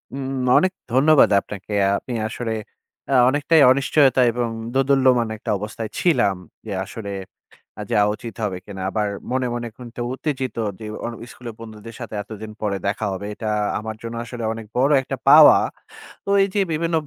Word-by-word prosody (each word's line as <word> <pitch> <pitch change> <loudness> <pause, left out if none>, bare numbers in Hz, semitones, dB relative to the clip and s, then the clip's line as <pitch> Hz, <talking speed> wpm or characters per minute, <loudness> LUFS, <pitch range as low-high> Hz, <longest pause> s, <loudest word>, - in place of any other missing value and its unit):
উম 135 -1 -4 0.3
অনেক 185 - +3 0.2
ধন্যবাদ 145 +3 +5
আপনাকে। 105 +1 -8 0.2
আপনি 125 - -7
আসলে 115 +1 -4 0.6
আ - - +2 0.2
অনেকটাই 145 +3 +3
অনিশ্চয়তায় 130 -1 +3
এবং 120 -1 -1 0.2
দোদুল্যমান 130 -3 +3
একটা 110 - -8
অবস্থায় 110 +2 -6
ছিলাম। 120 - +2 0.3
যে 110 - -6
আসলে 100 -1 -7 0.7
আ - - -3
যাওয়া 105 0 +3
উচিত 115 0 -9
হবে 95 -3 -2
কিনা? 95 -1 -9
আবার 105 -1 -1 0.2
মনে, 130 0 0
মনে 120 0 -4
কিন্তু 120 -1 -9
উত্তেজিত 135 -2 -3 0.2
যে 110 - -7 0.2
অ - - -1 0.3
স্কুলের 120 -2 -9
বন্ধুদের 110 0 -10
সাথে 120 -2 -7
এতদিন 110 0 -9
পরে 100 -2 0
দেখা 105 +1 -2
হবে। 95 +2 -5
এটা 110 0 -4 0.3
আমার 110 0 -6
জন্য 115 0 -6
আসলে 120 -1 -7
অনেক 115 -1 -7
বড় 135 +4 +3
একটা - - -5
পাওয়া। - - +9 0.7
তো - - -5
এইযে 200 +1 -1
বিভিন্ন 165 +1 0
120 Hz, 160 wpm, -22 LUFS, 110-135 Hz, 0.7 s, পাওয়া